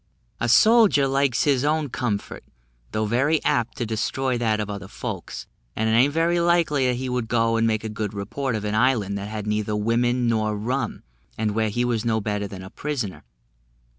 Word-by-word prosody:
A 120 Hz, -, 0 dB
soldier 215 Hz, -, +5 dB
likes 135 Hz, -2 st, +1 dB
his 140 Hz, -3 st, +2 dB
own 150 Hz, 0 st, +1 dB
comfort, 110 Hz, -4 st, -3 dB, 0.5 s
although 110 Hz, 0 st, -1 dB
very 135 Hz, +8 st, +2 dB
apt 120 Hz, -1 st, 0 dB
to 120 Hz, -, -2 dB
destroy 125 Hz, +4 st, -1 dB
that 110 Hz, -3 st, 0 dB
of 105 Hz, -, -2 dB
other 100 Hz, -1 st, -6 dB
folks; -, -, -6 dB, 0.3 s
and 110 Hz, -, 0 dB
it -, -, +2 dB
a'n't 125 Hz, +6 st, +4 dB
very 165 Hz, +3 st, +1 dB
likely 165 Hz, -6 st, +2 dB
he 130 Hz, +2 st, -4 dB
would 125 Hz, -2 st, -2 dB
go 115 Hz, 0 st, +1 dB
and 115 Hz, 0 st, +2 dB
make 110 Hz, -1 st, 0 dB
a -, -, -3 dB
good 105 Hz, -1 st, -4 dB
report 115 Hz, +5 st, -3 dB
of 105 Hz, -1 st, -3 dB
an 105 Hz, -, -2 dB
island 110 Hz, -4 st, +2 dB
that 100 Hz, -, -5 dB
had 105 Hz, -1 st, -5 dB
neither 105 Hz, 0 st, -1 dB
women 120 Hz, +3 st, +1 dB
nor 110 Hz, -2 st, 0 dB
rum, 125 Hz, +3 st, -3 dB, 0.3 s
and 110 Hz, -1 st, 0 dB
where 110 Hz, +1 st, 0 dB
he 120 Hz, +4 st, 0 dB
was 115 Hz, -3 st, 0 dB
no 115 Hz, -2 st, +1 dB
better 105 Hz, -1 st, -2 dB
than 95 Hz, -1 st, -9 dB
a 95 Hz, -, -10 dB
prisoner. 110 Hz, -, -4 dB
115 Hz, 195 wpm, -24 LUFS, 105-135 Hz, 0.5 s, soldier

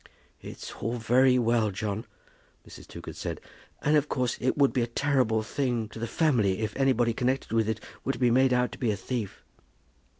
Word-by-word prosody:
"It's -, -, -8 dB
all 115 Hz, +1 st, -1 dB
very 125 Hz, +3 st, +4 dB
well, 115 Hz, -2 st, +2 dB
John," 105 Hz, +2 st, -4 dB, 0.6 s
Mrs. -, -, -12 dB
Toogood -, -, -9 dB
said; -, -, -4 dB, 0.4 s
"and 150 Hz, +1 st, +3 dB
of 150 Hz, 0 st, +2 dB
course 125 Hz, -3 st, 0 dB
it 130 Hz, +3 st, 0 dB
would 140 Hz, -1 st, +4 dB
be 125 Hz, -, +1 dB
a 120 Hz, -, 0 dB
terrible 120 Hz, -3 st, +1 dB
thing 120 Hz, -1 st, -1 dB
to 110 Hz, -, -10 dB
the 115 Hz, -, -2 dB
family 115 Hz, -, +1 dB
if 110 Hz, -1 st, -3 dB
anybody 125 Hz, -4 st, +2 dB
connected 130 Hz, +1 st, -1 dB
with 110 Hz, -1 st, +2 dB
it 110 Hz, -1 st, -1 dB, 0.2 s
were 135 Hz, -, 0 dB, 0.2 s
made 130 Hz, +2 st, +4 dB
out 125 Hz, -2 st, +2 dB
to -, -, -10 dB
be 120 Hz, -, 0 dB
a 105 Hz, -, 0 dB
thief." 110 Hz, -1 st, -5 dB
120 Hz, 190 wpm, -28 LUFS, 110-130 Hz, 0.6 s, very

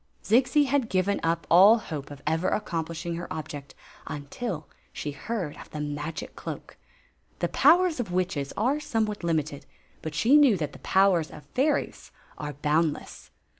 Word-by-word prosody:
Zixi 250 Hz, +6 st, +4 dB
had 265 Hz, -3 st, +1 dB
given 190 Hz, +2 st, +1 dB
up 165 Hz, -1 st, 0 dB
all 195 Hz, +7 st, +8 dB
hope 150 Hz, -10 st, -6 dB
of 145 Hz, -1 st, -11 dB
ever 160 Hz, +3 st, +1 dB
accomplishing 170 Hz, -3 st, -3 dB
her 175 Hz, -, -7 dB
object 145 Hz, -3 st, -6 dB, 0.3 s
until 155 Hz, +4 st, -5 dB, 0.2 s
she 150 Hz, -, -4 dB
heard 165 Hz, -, -4 dB
of -, -, -12 dB
the 155 Hz, -, -6 dB
magic 150 Hz, +1 st, -5 dB
cloak. -, -, -7 dB, 0.6 s
The -, -, 0 dB
powers 355 Hz, -4 st, +4 dB
of 215 Hz, -7 st, -3 dB
witches 175 Hz, -6 st, -1 dB
are 260 Hz, +8 st, +1 dB
somewhat 220 Hz, -8 st, -2 dB
limited; 155 Hz, -4 st, -1 dB, 0.3 s
but 160 Hz, -1 st, -5 dB
she 240 Hz, -, +5 dB
knew 275 Hz, -9 st, +6 dB
that 150 Hz, -4 st, -3 dB
the -, -, -12 dB
powers 190 Hz, -5 st, +3 dB
of 150 Hz, -, -12 dB
fairies 285 Hz, +3 st, 0 dB, 0.3 s
are 150 Hz, -1 st, -4 dB
boundless. 150 Hz, +2 st, -1 dB
170 Hz, 155 wpm, -27 LUFS, 150-225 Hz, 0.6 s, all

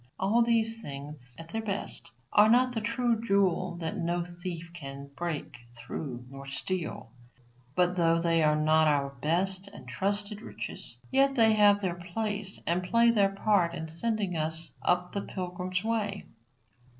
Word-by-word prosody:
All 210 Hz, +5 st, +3 dB
these 225 Hz, -1 st, +2 dB
things, 140 Hz, -, -8 dB
at 165 Hz, 0 st, -10 dB
their 225 Hz, +5 st, -2 dB
best, 205 Hz, -2 st, -2 dB, 0.2 s
are 210 Hz, +1 st, +7 dB
not 250 Hz, +2 st, +5 dB
the 225 Hz, -, -2 dB
true 230 Hz, 0 st, 0 dB
jewel 185 Hz, -4 st, +1 dB
that 160 Hz, -, -2 dB
no 170 Hz, +1 st, -1 dB
thief 175 Hz, -1 st, -6 dB
can 140 Hz, -3 st, -8 dB
break 165 Hz, -7 st, -4 dB, 0.2 s
through 125 Hz, -1 st, -6 dB
nor 135 Hz, +1 st, -10 dB
steal; 160 Hz, -2 st, -4 dB, 0.6 s
but 180 Hz, 0 st, +3 dB
though 165 Hz, -1 st, +3 dB
they 165 Hz, -1 st, +2 dB
are 150 Hz, -1 st, +4 dB
not 155 Hz, +1 st, +4 dB
our 140 Hz, -2 st, +2 dB
best 185 Hz, +5 st, 0 dB
and 200 Hz, -10 st, -12 dB
truest 200 Hz, -, -1 dB
riches, -, -, -7 dB
yet 275 Hz, +1 st, +4 dB
they 225 Hz, -3 st, +6 dB
have 205 Hz, -1 st, +5 dB
their 185 Hz, -3 st, 0 dB
place 195 Hz, +3 st, -3 dB
and 175 Hz, +2 st, +1 dB
play 230 Hz, +6 st, +4 dB
their 200 Hz, -3 st, +4 dB
part 195 Hz, -4 st, +2 dB
in 160 Hz, -1 st, -5 dB
sending 200 Hz, +2 st, -1 dB
us 160 Hz, +1 st, +2 dB
up 180 Hz, 0 st, +1 dB
the 200 Hz, -, -1 dB
pilgrim 180 Hz, -1 st, -5 dB
way. 215 Hz, -3 st, -1 dB
180 Hz, 160 wpm, -29 LUFS, 160-210 Hz, 0.6 s, are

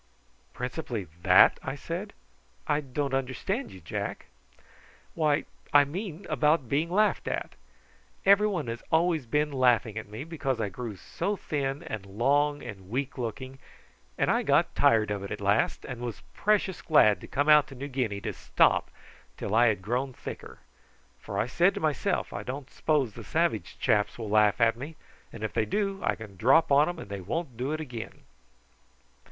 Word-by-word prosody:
"Principally 125 Hz, -, -4 dB, 0.2 s
that!" -, -, +6 dB
I -, -, -4 dB
said. -, -, -5 dB, 0.5 s
"I 145 Hz, -, +1 dB
don't 140 Hz, 0 st, -3 dB
understand 135 Hz, -, -2 dB
you, 95 Hz, -, -11 dB
Jack." 80 Hz, -, -4 dB, 0.9 s
"Why, 155 Hz, -2 st, +1 dB, 0.3 s
I 145 Hz, 0 st, +8 dB
mean 180 Hz, +3 st, -6 dB
about 150 Hz, -2 st, +2 dB
being 150 Hz, +7 st, 0 dB
laughed 210 Hz, +4 st, +2 dB
at! -, -, -3 dB, 0.7 s
Everybody 200 Hz, -, +4 dB
has 115 Hz, -, -6 dB
always 160 Hz, -4 st, +2 dB
been 150 Hz, +4 st, +1 dB
laughing 125 Hz, -4 st, +2 dB
at 110 Hz, -, -9 dB
me, 110 Hz, +6 st, -6 dB
because 145 Hz, -6 st, -3 dB
I 105 Hz, -3 st, -1 dB
grew 110 Hz, +2 st, -6 dB
so 200 Hz, -, -3 dB
thin 140 Hz, -5 st, -3 dB
and 110 Hz, -3 st, -5 dB
long 145 Hz, +8 st, +1 dB
and 95 Hz, -6 st, -9 dB
weak 130 Hz, +3 st, -3 dB
looking, 130 Hz, +3 st, -5 dB, 0.6 s
and -, -, +2 dB
I -, -, +2 dB
got -, -, +2 dB
tired 110 Hz, -2 st, +3 dB
of 100 Hz, -1 st, -2 dB
it 100 Hz, -, -6 dB
at 105 Hz, -, -5 dB
last, 100 Hz, +2 st, +1 dB
and 125 Hz, -2 st, -6 dB
was 120 Hz, -3 st, -5 dB
precious 205 Hz, -4 st, +1 dB
glad 110 Hz, -10 st, +4 dB
to -, -, -9 dB
come 145 Hz, +2 st, 0 dB
out 150 Hz, -1 st, +7 dB
to 135 Hz, -, -11 dB
New 135 Hz, +3 st, -5 dB
Guinea 125 Hz, -7 st, -2 dB
to -, -, -3 dB
stop -, -, +2 dB, 0.5 s
till -, -, -4 dB
I 120 Hz, +2 st, +5 dB
had 105 Hz, -4 st, 0 dB
grown 125 Hz, +5 st, -1 dB
thicker. -, -, -8 dB, 0.6 s
For -, -, -6 dB
I -, -, +2 dB
said -, -, +2 dB
to -, -, -3 dB
myself, -, -, -1 dB
I -, -, -4 dB
don't 135 Hz, +1 st, -6 dB
s'pose 145 Hz, -8 st, 0 dB
the -, -, -9 dB
savage 155 Hz, -, -1 dB
chaps 105 Hz, -1 st, +1 dB
will 110 Hz, -3 st, -5 dB
laugh 105 Hz, 0 st, +4 dB
at 115 Hz, -1 st, +4 dB
me, 140 Hz, +7 st, -8 dB, 0.4 s
and 110 Hz, -, -9 dB
if 110 Hz, -, -3 dB
they 110 Hz, -, +1 dB
do 195 Hz, -, -1 dB
I -, -, +1 dB
can 105 Hz, -4 st, -11 dB
drop 135 Hz, -, +4 dB
on 145 Hz, +4 st, +5 dB
'em 175 Hz, -, -5 dB
and 100 Hz, -, -9 dB
they 100 Hz, -1 st, -4 dB
won't 130 Hz, -, -4 dB
do 130 Hz, +5 st, -2 dB
it 155 Hz, -, -2 dB
again." 120 Hz, -7 st, -7 dB
130 Hz, 180 wpm, -28 LUFS, 110-155 Hz, 0.9 s, I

